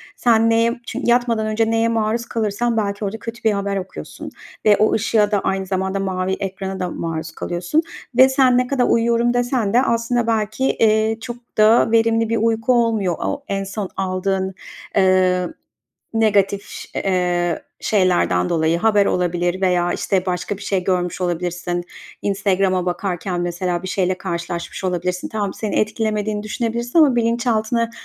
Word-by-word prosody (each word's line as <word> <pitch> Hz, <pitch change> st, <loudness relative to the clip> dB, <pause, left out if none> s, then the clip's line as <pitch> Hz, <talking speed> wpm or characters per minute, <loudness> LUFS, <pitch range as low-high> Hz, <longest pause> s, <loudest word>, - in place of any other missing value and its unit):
Sen 230 Hz, -1 st, +3 dB
neye 230 Hz, +1 st, +2 dB
çünkü -, -, -4 dB
yatmadan 235 Hz, -3 st, +2 dB
önce 225 Hz, +1 st, +1 dB
neye 225 Hz, 0 st, +2 dB
maruz 230 Hz, +1 st, 0 dB
kalırsan 230 Hz, +1 st, -1 dB
belki 205 Hz, -1 st, -1 dB
orada 200 Hz, +3 st, -3 dB
kötü 230 Hz, +2 st, -8 dB
bir 220 Hz, -, +4 dB
haber 200 Hz, -1 st, -1 dB
okuyorsun 190 Hz, 0 st, -7 dB, 0.4 s
ve 210 Hz, -1 st, +6 dB
o 215 Hz, -, +3 dB
ışığa 215 Hz, -1 st, +2 dB
da 205 Hz, -, +2 dB
aynı 190 Hz, 0 st, -1 dB
zamanda 190 Hz, +1 st, -1 dB
mavi 190 Hz, -1 st, -1 dB
ekrana 190 Hz, 0 st, -4 dB
da 180 Hz, -1 st, -2 dB
maruz 160 Hz, -1 st, -4 dB
kalıyorsun 175 Hz, -, -1 dB, 0.4 s
ve 260 Hz, +1 st, +8 dB
sen 265 Hz, -2 st, +4 dB
ne 250 Hz, 0 st, +1 dB
kadar 255 Hz, -2 st, +1 dB
uyuyorum 235 Hz, +1 st, +2 dB
desen 245 Hz, -4 st, 0 dB
de 245 Hz, -, +5 dB
aslında 235 Hz, -1 st, 0 dB
belki, 220 Hz, +2 st, 0 dB
eee, 220 Hz, -2 st, +2 dB
çok 240 Hz, 0 st, -5 dB, 0.2 s
da 220 Hz, +1 st, +5 dB
verimli 225 Hz, 0 st, +3 dB
bir 230 Hz, -, +1 dB
uyku 225 Hz, +2 st, +1 dB
olmuyor 225 Hz, -7 st, +1 dB
o 285 Hz, 0 st, -3 dB
en 195 Hz, 0 st, -2 dB
son 195 Hz, 0 st, -5 dB
aldığın, 190 Hz, 0 st, -1 dB, 0.4 s
eee, 185 Hz, -2 st, +3 dB, 0.7 s
negatif 205 Hz, -3 st, +2 dB
ş -, -, -9 dB, 0.2 s
eee, 180 Hz, -3 st, 0 dB, 0.2 s
şeylerden 180 Hz, -, +2 dB
dolayı 165 Hz, 0 st, +1 dB
haber 205 Hz, 0 st, +3 dB
olabilir 175 Hz, +1 st, 0 dB
veya, 180 Hz, -2 st, +2 dB
işte, 190 Hz, -2 st, -1 dB
başka 185 Hz, +3 st, -2 dB
bir 200 Hz, -, -11 dB
şey 190 Hz, -3 st, -1 dB
görmüş 180 Hz, -1 st, -1 dB
olabilirsin. 175 Hz, 0 st, -2 dB, 0.4 s
Instagram'a 190 Hz, -2 st, +1 dB
bakarken 180 Hz, -1 st, -2 dB
mesela 175 Hz, 0 st, -2 dB
bir 185 Hz, -, -5 dB
şeyle 185 Hz, -3 st, 0 dB
karşılaşmış 170 Hz, 0 st, -5 dB
olabilirsin. 180 Hz, 0 st, -2 dB
Tamam, 205 Hz, -3 st, -3 dB
seni 215 Hz, -2 st, -4 dB
etkilemediğini 215 Hz, -1 st, -1 dB
düşünebilirsin 235 Hz, +6 st, -2 dB
ama 285 Hz, -6 st, +5 dB
bilinçaltına 230 Hz, -1 st, +1 dB
205 Hz, 155 wpm, -20 LUFS, 185-230 Hz, 0.7 s, ve